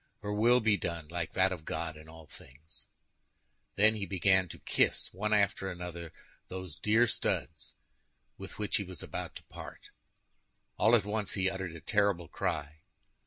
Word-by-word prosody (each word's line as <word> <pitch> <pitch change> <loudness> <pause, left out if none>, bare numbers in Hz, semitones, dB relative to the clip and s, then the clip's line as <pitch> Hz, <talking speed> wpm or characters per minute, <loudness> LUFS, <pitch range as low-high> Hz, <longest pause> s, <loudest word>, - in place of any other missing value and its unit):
Her 105 0 -2
will 120 +4 +4
be 110 -2 +3
done, 85 -4 -4
like 85 -1 -3
that 95 0 +3
of 90 -4 -5
God, 80 -1 -3
in 80 +1 -13
all 80 0 -12
things." 75 +3 -14 0.9
Then, 110 +2 +6
he 100 -3 -4
began 95 +1 +3
to - - -8
kiss, - - +1
one 105 +4 -2
after 100 -2 +2
the 90 - -7
other, 85 -2 -7 0.4
those 95 -4 -6
dear 110 +7 +4
studs 80 - -1 0.6
with - - -9
which 105 -1 0
he 100 - -2
was 90 -2 -7
about - - -5
to - - -9
part. - - -11 0.8
All 110 +3 +5
at 110 - +2
once 105 -1 -1
he 95 0 +1
uttered 95 -4 -5
a 85 - -9
terrible 100 -5 +1
cry. 75 +1 -3
95 Hz, 170 wpm, -31 LUFS, 85-105 Hz, 0.9 s, Then